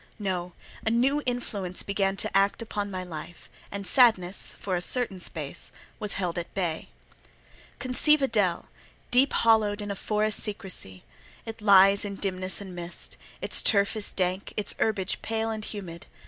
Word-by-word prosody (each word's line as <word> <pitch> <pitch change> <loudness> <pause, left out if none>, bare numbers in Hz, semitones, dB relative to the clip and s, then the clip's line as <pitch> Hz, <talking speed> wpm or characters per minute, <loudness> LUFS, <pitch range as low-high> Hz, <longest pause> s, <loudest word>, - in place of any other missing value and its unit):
No: 180 -4 -3 0.3
a - - +1
new 260 +6 +2
influence 205 -7 -2
began 195 -1 0
to - - -2
act 200 +3 +2
upon 205 -2 -3
my 185 -1 -4
life, 170 -1 -9 0.2
and 200 0 -5
sadness, 195 -5 +4
for 190 -2 -2
a 175 - -1
certain 220 -2 -1
space, 160 -2 -3 0.3
was 210 -2 -2
held 180 -3 -2
at 170 - -7
bay. 175 -5 -2 0.9
Conceive 270 +4 +3
a - - +4
dell, 200 -7 +1 0.5
deep 260 +3 +5
hollowed 220 -2 +3
in 205 -1 -3
forest 210 +2 0
secresy; 185 - -4 0.4
it 225 -1 -8
lies 195 -1 +6
in 200 -1 -3
dimness 185 -1 -2
and 195 -2 -8
mist: 175 0 -4 0.3
its - - +3
turf 200 0 +3
is 215 -2 0
dank, 185 +1 -2
its 205 -1 +2
herbage 205 -3 0
pale 225 0 -2
and 215 -1 -5
humid. 175 -5 -7
200 Hz, 160 wpm, -27 LUFS, 185-220 Hz, 0.9 s, lies